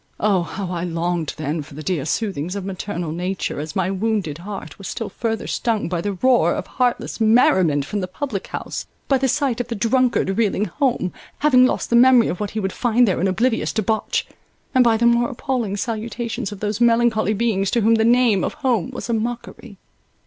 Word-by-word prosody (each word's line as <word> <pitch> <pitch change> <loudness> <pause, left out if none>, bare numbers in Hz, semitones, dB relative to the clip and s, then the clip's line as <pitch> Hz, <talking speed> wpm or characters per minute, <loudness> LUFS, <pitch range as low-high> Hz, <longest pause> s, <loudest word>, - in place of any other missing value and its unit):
Oh, 200 -4 +2
how 180 +2 -5
I 175 -1 -3
longed 170 -1 -2
then 155 +1 -2
for 145 -1 -12
the 155 - -7
dear 160 -4 -1
soothings 185 -5 -2
of 200 -2 -4
maternal 185 -3 -4
Nature, 180 0 -3
as 155 +1 -6
my 190 0 0
wounded 195 -6 -1
heart 190 -4 -8
was 195 - -7
still 225 -3 -4
further 225 +2 -3
stung 225 -3 -1
by 175 -1 -1
the 205 +2 -2
roar 225 -4 +3
of - - -4
heartless 245 -2 -1
merriment 190 - +4
from 205 +8 -3
the 185 - -3
public 210 0 -4
house, - - -5 0.2
by 270 -2 +3
the 265 - +1
sight 265 -3 0
of 240 - -6
the 235 - -4
drunkard 230 -2 +1
reeling 210 -2 +1
home, 245 -9 -1 0.2
having 255 -4 +5
lost - - -2
the - - +4
memory 245 -1 +6
of 180 - -3
what 210 -1 -2
he - - +1
would 190 -2 -2
find 240 0 +2
there 185 -4 0
in 190 - +2
oblivious 225 +5 +1
debauch, 220 0 -1 0.5
and 255 -2 +5
by 230 -2 +3
the 235 - +1
more 235 0 +3
appalling 240 -5 -2
salutations 225 0 -3
of 205 - -9
those 210 +1 -2
melancholy 230 -2 +3
beings 200 -3 0
to 235 - +1
whom 225 +2 +4
the 220 -1 +3
name 235 -4 +4
of - - -2
home 240 - 0
was - - -6
a 235 - -1
mockery. 230 -1 -4
215 Hz, 205 wpm, -21 LUFS, 185-235 Hz, 0.5 s, memory